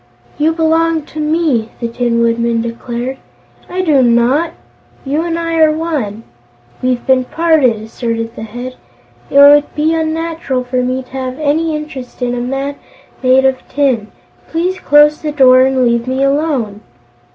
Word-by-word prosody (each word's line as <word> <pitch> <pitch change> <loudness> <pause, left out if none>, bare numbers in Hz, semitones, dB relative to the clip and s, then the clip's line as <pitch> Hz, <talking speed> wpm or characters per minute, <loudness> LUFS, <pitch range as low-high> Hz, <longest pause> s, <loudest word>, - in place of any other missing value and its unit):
"You 310 +2 +3
belong 325 0 +1
to 310 - -9
me," 300 -7 0
the 235 - -2
Tin 235 0 -1
Woodman 235 0 +1
declared. 240 +2 -5 0.5
"I 370 +1 -2
do 300 -6 +3
not!" 245 +7 +2 0.5
"You 290 +4 0
and 335 0 -2
I 330 0 -2
are 315 -1 +5
one." 295 -10 -3 0.6
"We've 255 -1 -1
been 260 -1 +3
parted," 315 -4 +2
asserted 230 0 -4
the - - -8
Head. 245 +3 -7 0.5
"It - - 0
would 290 +1 +6
be 310 +2 +1
unnatural 320 -4 -2
for 250 0 -1
me 255 +1 -2
to - - -23
have 260 -1 -5
any 310 +1 0
interest 270 -5 -7
in 245 0 -1
a 245 - -2
man 270 +3 -3 0.4
made 260 +1 +4
of 265 -1 +2
tin. 260 -7 0 0.4
Please 360 +3 -2
close 295 +1 +4
the 305 - -3
door 255 -3 +6
and 265 -1 +1
leave 235 0 0
me 260 +1 0
alone." 275 -8 -1
265 Hz, 160 wpm, -14 LUFS, 245-315 Hz, 0.6 s, would